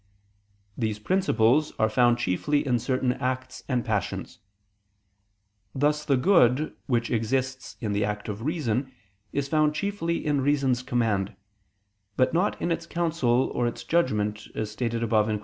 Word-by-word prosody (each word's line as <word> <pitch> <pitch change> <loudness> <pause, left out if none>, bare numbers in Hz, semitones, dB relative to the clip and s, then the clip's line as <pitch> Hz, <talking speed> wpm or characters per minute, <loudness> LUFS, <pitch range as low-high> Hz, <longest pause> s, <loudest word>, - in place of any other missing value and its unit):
These 110 -3 -1
principles 150 - +2
are 110 - +3
found 120 +2 +3
chiefly 120 +8 0
in 125 -3 +2
certain 130 +1 0
acts 130 0 -3
and 125 -3 0
passions. 105 -4 -3 1.4
Thus 150 +2 +1
the 140 -3 +3
good 150 -3 +3
which 120 -3 0
exists 130 +3 -1
in 110 -4 -2
the 105 +1 +1
act 105 0 -3
of 105 0 -5
reason, 130 -3 -1 0.4
is 140 -1 -1
found 155 0 +2
chiefly 170 -2 -2
in 145 -2 +1
reason's 135 -3 +2
command, 110 -6 0 0.8
but 130 +2 +3
not 180 +5 +1
in 170 - -1
its 170 0 -2
counsel 155 -8 +1
or 120 - +1
its 120 - -5
judgment, 105 -11 0
as 105 -1 -3
stated 115 +1 -2
above 110 -2 +2
(Q. 105 -1 -1
125 Hz, 150 wpm, -26 LUFS, 110-150 Hz, 1.4 s, are